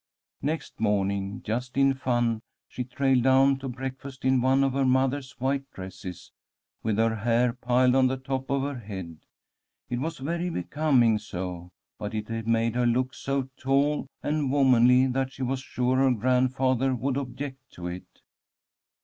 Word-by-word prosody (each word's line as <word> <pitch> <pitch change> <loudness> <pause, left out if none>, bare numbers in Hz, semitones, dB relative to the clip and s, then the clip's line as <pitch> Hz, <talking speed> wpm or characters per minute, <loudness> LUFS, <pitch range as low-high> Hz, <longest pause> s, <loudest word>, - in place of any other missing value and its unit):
Next 155 +3 -3
morning, 100 -1 0
just 125 +4 -3
in 135 0 +5
fun, 120 -4 0 0.3
she 125 - -4
trailed 130 0 +1
down 135 +1 +4
to 135 0 -5
breakfast 130 +1 -7
in 130 -1 +4
one 135 +2 +3
of 135 -1 +1
her 135 0 +1
mother's 130 +1 +1
white 135 +1 -1
dresses, 95 -1 -8 0.5
with 110 -2 -1
her 115 0 +2
hair 120 +2 +2
piled 125 0 +2
on 130 -1 +5
the 130 +1 -1
top 130 0 -4
of 140 -1 +1
her 140 -2 -3
head. 95 -7 -7 0.7
It 120 - -1
was 160 +4 -3
very 170 +6 -2
becoming 125 - +2
so, 90 -4 -6 0.3
but 105 +1 -4
it 115 +1 -4
made 115 0 +2
her 125 0 +2
look 125 +2 +1
so 135 -1 -2
tall 140 +2 +1 0.2
and 145 -3 0
womanly 130 -2 +5
that 130 +1 -1
she 135 - -5
was 130 +1 -1
sure 125 0 0
her 135 0 +4
grandfather 130 +2 +2
would 130 +3 -1
object 130 0 -6
to 90 - -8
it. 90 +1 -8
130 Hz, 160 wpm, -27 LUFS, 115-135 Hz, 0.7 s, in